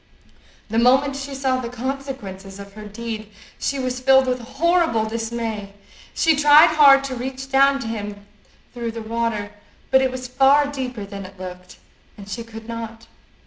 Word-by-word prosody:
The 225 - +2
moment 265 +3 +4
she 275 0 -6
saw 265 -1 0
the 235 - -5
consequences 245 -7 -6
of 200 0 -10
her 215 +1 -10
deed 220 0 -6 0.3
she 280 - -1
was 255 -1 -2
filled 265 +1 +5
with 255 -1 -1
horrible 275 -1 +1
dismay. 225 -2 -4 0.4
She 325 -2 +3
tried 295 +1 +7
hard 275 -2 +7
to 270 -2 -4
reach 265 +2 -6
down 275 +1 +5
to 230 - -5
him 205 -2 -6 0.5
through 235 -2 -4
the 225 -1 -6
water, 220 -2 -2 0.4
but 265 0 +6
it 265 - +2
was 255 0 -6
far 270 +3 +4
deeper 255 -6 -5
than 200 0 -8
it 190 0 -12
looked, 180 0 -9 0.4
and 200 -1 -11
she 215 +4 -5
could 225 -1 -11
not. 230 -1 -7
240 Hz, 170 wpm, -22 LUFS, 220-270 Hz, 0.5 s, tried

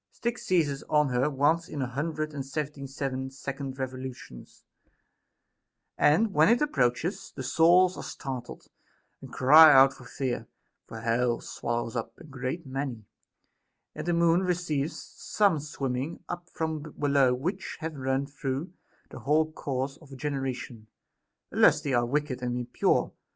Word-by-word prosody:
Styx 235 0 -4
seizes 150 -7 +1
on 150 -2 +3
ht 125 -1 0
r 140 - +2
once 150 +5 +1
in 145 - -5
a 130 - 0
hundred 155 +4 -3
and 140 -2 -4
seventy 140 0 -5
seven 130 -1 -4
second 135 0 -6
revolutions; 130 - -7 1.3
and 195 +8 +3
when 155 +3 +5
it 235 +1 +4
approaches, 160 - 0
the 130 - -5
souls 175 +7 +4
are - - -5
startled, 130 -3 -7 0.6
and - - -11
cry 155 +4 +8
out 135 0 +7
for 130 - -14
fear; 125 +1 -3 0.4
for 115 - -8
hell 115 +1 +1
swallows 120 0 -4
up 115 -1 -4
a - - -14
great 135 +2 -5
many, 130 -5 -4 0.9
and 150 +2 -6
the 175 - +2
Moon 170 +1 +4
receives 170 -5 -1
some 200 -7 0
swimming 140 0 -4
up 175 0 -6
from 160 -1 -3 0.2
below 140 -3 +3
which 180 +9 -4
have 160 0 -4
run 135 0 -1
through 140 +4 -4 0.4
their - - -8
whole 155 +2 +2
course 135 -2 -3
of 140 -4 -13
generation, 130 -5 -4 0.6
unless 150 - +5
they 145 -3 -3
are 120 -1 +2
wicked 140 -1 -1
and 125 -1 -2
impure. 120 0 0
140 Hz, 150 wpm, -28 LUFS, 130-160 Hz, 1.3 s, cry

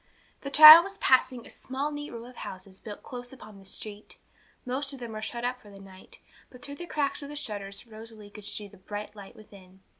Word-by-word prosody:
The 275 - -5
child 310 +3 +12
was 395 +1 -8
passing 255 -2 +2
a - - -13
small 270 +3 -4
neat 290 0 -6
row 230 0 -9
of 250 0 -14
houses 190 0 -9
built 210 -2 -10
close 245 -1 -7
upon 215 -6 -13
the 195 - -17
street. 210 +2 -8 0.5
Most 270 +3 -3
of 270 - -9
them 240 -2 -7
were 215 0 -6
shut 235 +2 -5
up 250 +1 -2
for 210 - -17
the 200 - -13
night, 190 -1 -14 0.3
but 250 -1 -16
through 285 0 -9
the 345 - -8
cracks 295 -4 -2
of 280 - -8
the 295 - -8
shutters 205 -7 -6
Rosalie 220 -2 -12
could 210 -1 -12
see 210 0 -6
the - - -18
bright 205 +3 -8
light 200 -2 -12
within. 190 -3 -17
230 Hz, 230 wpm, -28 LUFS, 205-270 Hz, 0.5 s, child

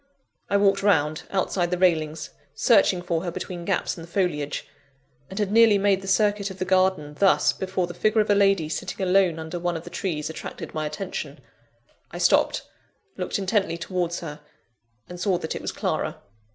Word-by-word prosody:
I 200 - +3
walked 200 -1 +3
round, 155 -6 +1
outside 185 -2 0
the 180 - -1
railings, 160 -3 +1 0.2
searching 195 -6 +4
for 170 -1 -1
her 180 - -2
between 175 0 -6
gaps 195 -1 0
in 170 - -10
the 165 - -10
foliage; 170 -6 -1 0.6
and 190 - -9
had 205 -2 0
nearly 225 -1 +6
made 195 -1 +2
the 195 - -9
circuit 205 0 +2
of 190 - -9
the 185 - -2
garden 185 -5 +2
thus, 195 -1 +4
before 185 -1 -2
the 175 - -8
figure 215 +5 +1
of 210 - +2
a - - +6
lady 195 -5 +3
sitting 190 +4 -3
alone 185 -3 +3
under 160 +2 -5
one 175 -1 -1
of 160 - -8
the - - -10
trees, 155 -6 -3
attracted 160 - -7
my 155 -1 -2
attention. 150 +6 -5 0.7
I - - -8
stopped - - +3 0.5
looked 180 - -2
intently 195 -3 0
towards 175 0 -2
her 150 -3 -7 0.7
and 180 0 -9
saw 185 0 +1
that 160 - -4
it - - -5
was - - -3
Clara. - - -2
185 Hz, 190 wpm, -25 LUFS, 165-195 Hz, 0.7 s, nearly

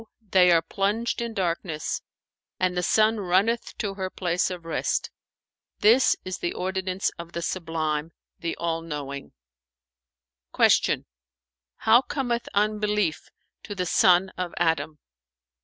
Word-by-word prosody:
they 180 -1 +6
are 165 -1 +5
plunged 215 +5 -1
in 235 -1 -3
darkness, 170 -5 -2 0.6
and 185 -1 +1
the 180 - +1
Sun 215 +4 +3
runneth 200 +5 +1
to 205 -3 -2
her 190 -1 -4
place 180 -1 0
of 180 -2 -7
rest; 165 - -1 0.7
this 230 +5 +5
is 185 0 -4
the 175 - -2
ordinance 190 0 -1
of 170 0 -8
the 170 - -3
Sublime, 160 -3 -2 0.3
the 170 - -3
All 165 -1 -1
knowing.'"[FN#430] 65 - -3
Q - - -1 0.7
"How 225 +2 +5
cometh 245 -4 -2
unbelief 210 -4 0 0.3
to 205 - -7
the 180 -2 -1
son 180 +2 +4
of 180 -1 -3
Adam?" 160 -2 0
180 Hz, 125 wpm, -25 LUFS, 160-205 Hz, 0.7 s, they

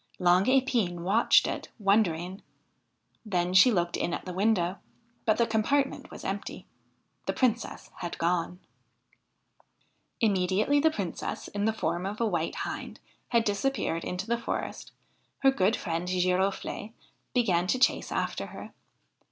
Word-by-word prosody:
Long 180 +1 +4
Epine 245 -9 +2
watched 200 +7 +4
it, - - -4
wondering. 195 -3 +1 0.8
Then 180 -4 -1
she 190 +7 +7
looked 175 -4 0
in 170 - -1
at - - -8
the 180 - -5
window, 190 -2 +1 0.5
but 215 - +3
the 235 - +3
compartment 265 +5 0
was - - -10
empty. - - -4 0.6
The - - +1
Princess 235 -3 -1
had 175 -1 -5
gone! 175 +1 0 1.6
Immediately 205 +6 +2
the 320 +2 +4
Princess, 200 - -4
in 205 0 -2
the 220 - +3
form 175 -3 -2
of 205 +2 -5
a 235 - +2
white 170 -6 -1
hind, - - -6 0.3
had 235 -1 +2
disappeared 205 -5 -1
into 180 +2 -3
the 235 +1 0
forest, - - -4 0.5
her 270 - +7
good 210 -3 +2
friend 170 -1 -3
Giroflee 185 +4 0 0.4
began 185 -8 +2
to 255 - +2
chase 255 - +2
after - - -2
her. - - -10
195 Hz, 140 wpm, -28 LUFS, 180-230 Hz, 1.6 s, she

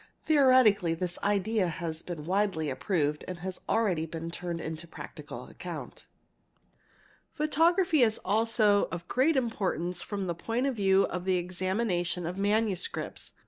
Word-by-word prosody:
Theo 295 -3 +4
retically 210 -10 +5
this 180 0 -3
idea 205 0 +1
has 165 -1 -4
been 165 -4 -7
widely 185 -5 0
approved 150 0 -1
and 185 - -5
has 185 0 -5
already 185 -8 +1
been 165 +1 -6
turned 165 -2 -4
to 170 - -9
practical - - -9
account®®, - - -8 1.3
Photography 325 +1 +3
is 220 -2 +4
also 215 0 +3
of 175 -1 -6
great 275 +4 +2
importance 180 -7 -1
from 200 -2 -4
the 175 - -1
point 230 +9 -2
of 275 -2 0
view 195 -2 +4
of 180 - -2
a - - -12
the 185 -1 +2
examination 185 0 -1
of 175 +2 -3
manuscripts®®. 205 -1 -1
190 Hz, 145 wpm, -29 LUFS, 170-225 Hz, 1.3 s, retically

